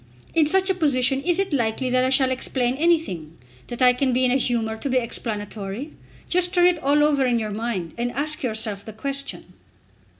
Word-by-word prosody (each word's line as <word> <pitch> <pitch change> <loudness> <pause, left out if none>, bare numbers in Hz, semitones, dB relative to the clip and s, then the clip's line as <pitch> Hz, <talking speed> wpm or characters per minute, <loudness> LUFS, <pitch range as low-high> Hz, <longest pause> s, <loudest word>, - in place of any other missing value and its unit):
In 320 -3 +3
such 380 +4 +2
a - - +2
position 270 -6 +2
is 350 +3 +1
it 390 -4 -1
likely 240 0 0
that 255 0 +3
I 260 - +2
shall 260 0 +3
explain 255 -1 -1
anything; 265 - 0 0.3
that 240 +1 -3
I 250 0 +6
can 260 0 0
be 255 +1 +2
in 250 - +2
a - - +2
humour 235 -4 0
to 275 - -4
be 260 - +2
explanatory? 215 +1 -4 0.4
Just 360 +1 +1
turn 355 0 +5
it 355 -2 +3
all 290 +2 +3
over 290 -2 +3
in 240 -1 +2
your 215 -2 -3
mind, 205 -6 -4
and 245 +1 -1
ask 300 +2 -2
yourself 220 -4 -2
the 220 - -9
question." 275 +5 -6
255 Hz, 205 wpm, -23 LUFS, 225-295 Hz, 0.4 s, I